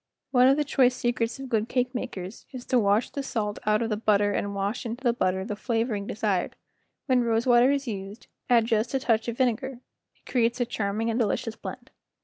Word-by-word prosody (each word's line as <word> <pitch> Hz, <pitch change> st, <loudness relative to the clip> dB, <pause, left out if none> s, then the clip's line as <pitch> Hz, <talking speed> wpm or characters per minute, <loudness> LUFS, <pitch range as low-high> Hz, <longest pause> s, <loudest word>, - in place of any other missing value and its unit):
One 250 Hz, -1 st, +5 dB
of 270 Hz, +2 st, +5 dB
the 300 Hz, -, +2 dB
choice 255 Hz, -3 st, +3 dB
secrets 235 Hz, 0 st, -1 dB
of 270 Hz, -, -6 dB
good 225 Hz, -2 st, 0 dB
cake 250 Hz, 0 st, 0 dB
makers 205 Hz, -6 st, -6 dB
is 255 Hz, -2 st, -8 dB
to 255 Hz, -, +2 dB
wash 205 Hz, +2 st, +2 dB
the 280 Hz, -, -3 dB
salt 210 Hz, -6 st, -3 dB
out 215 Hz, +2 st, +3 dB
of 225 Hz, -, -3 dB
the 210 Hz, -, 0 dB
butter 205 Hz, -1 st, +2 dB
and 200 Hz, 0 st, -2 dB
wash 200 Hz, +3 st, -2 dB
into 240 Hz, +3 st, -6 dB
the 240 Hz, -2 st, +3 dB
butter 190 Hz, -4 st, 0 dB
the 210 Hz, -1 st, -4 dB
flavoring 225 Hz, -2 st, -1 dB
desired; 200 Hz, -4 st, -1 dB, 0.5 s
when 255 Hz, -3 st, +3 dB
rose 230 Hz, 0 st, +1 dB
water 245 Hz, 0 st, +5 dB
is 280 Hz, -1 st, 0 dB
used 200 Hz, 0 st, -6 dB, 0.2 s
add 235 Hz, -2 st, +5 dB
just 225 Hz, +2 st, 0 dB
a -, -, +2 dB
touch 225 Hz, -3 st, +1 dB
of 235 Hz, 0 st, -3 dB
vinegar, 260 Hz, 0 st, 0 dB, 0.4 s
it -, -, -36 dB
creates 235 Hz, -1 st, +1 dB
a 245 Hz, -, +2 dB
charming 220 Hz, 0 st, -2 dB
and 230 Hz, -, -1 dB
delicious 225 Hz, 0 st, -1 dB
blend. -, -, -9 dB
230 Hz, 215 wpm, -26 LUFS, 210-250 Hz, 0.5 s, One